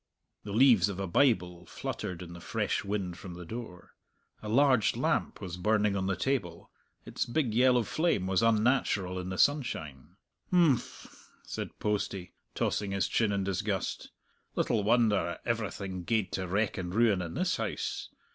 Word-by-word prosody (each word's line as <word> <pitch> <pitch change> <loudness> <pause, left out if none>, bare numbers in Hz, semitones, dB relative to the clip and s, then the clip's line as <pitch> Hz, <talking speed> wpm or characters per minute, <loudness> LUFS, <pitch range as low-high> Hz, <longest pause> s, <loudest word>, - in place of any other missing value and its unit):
The 100 - -7
leaves 110 -4 +5
of 95 -1 -5
a 100 - -1
Bible 90 -4 +1
fluttered 90 0 -5
in 85 -1 -9
the 85 - -10
fresh - - -1
wind 100 -3 -3
from 90 -3 -8
the 90 0 -8
door. 110 -3 -8 0.5
A 105 - -6
large 130 -1 +4
lamp - - 0
was 90 -2 -6
burning 105 +1 +2
on 95 -1 -1
the 95 - +1
table. 90 -5 -2 0.3
Its - - -3
big 120 -2 0
yellow 125 0 +4
flame 155 - 0
was 95 -1 +1
unnatural 110 -5 +2
in 90 0 -5
the 95 - -4
sunshine. 80 - 0 0.4
"H'mph!" 160 -9 +1 0.2
said - - -6
Postie, 100 -3 -2 0.2
tossing 105 - -1
his 100 -1 0
chin 110 -3 +1
in 100 -1 0
disgust, 95 0 -2 0.5
"little 110 - +1
wonder 105 -6 +2
everything 100 -5 -3
gaed 105 -1 0
to 95 -1 -3
wreck 100 +2 0
and 90 0 -4
ruin 110 -5 +3
in 85 -2 -5
this - - 0
house! - - -3
100 Hz, 160 wpm, -30 LUFS, 90-115 Hz, 0.5 s, leaves